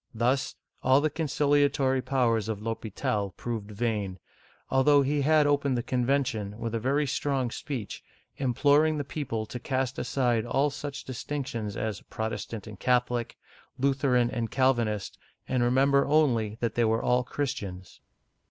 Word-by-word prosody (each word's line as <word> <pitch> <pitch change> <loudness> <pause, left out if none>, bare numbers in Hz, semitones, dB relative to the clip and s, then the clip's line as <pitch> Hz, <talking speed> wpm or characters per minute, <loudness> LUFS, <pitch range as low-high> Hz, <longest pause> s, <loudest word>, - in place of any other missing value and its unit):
Thus, 125 +4 +1 0.3
all 130 +1 +5
the 155 +1 0
conciliatory 145 -3 +2
powers 120 -5 +1
of 110 -2 -2
L'H6pital 105 -3 -3
proved 115 -4 -4
vain, 105 -3 -2 0.5
although 140 +2 +5
he 145 +2 0
had 155 +1 +4
opened 140 -3 +2
the 120 - -1
con 125 -1 -1
vention 110 -7 0
with 115 -1 -4
a 115 - 0
very 140 +6 +1
strong 135 -2 -1
speech, 125 -7 -5 0.3
imploring 145 +4 +3
the 145 - -1
people 125 -6 -4
to 125 - -7
cast 135 +3 -2
aside 120 -4 +1
all 140 +4 +1
such 145 0 -6
distinctions 125 -5 -4
as 110 -4 -3
Protestant 110 0 -5
and 105 -3 -10
Catho 125 -1 +2
lic, 120 -1 -3 0.4
Lutheran 130 -3 +2
and 115 -2 -2
Calvinist, 120 -6 0 0.3
and 130 -1 0
remember 135 +3 +3
only 120 -8 +2
that 115 -2 0
they 120 - +2
were 110 0 +1
all 125 0 +2
Christians. 100 -10 -5
125 Hz, 150 wpm, -28 LUFS, 115-140 Hz, 0.5 s, all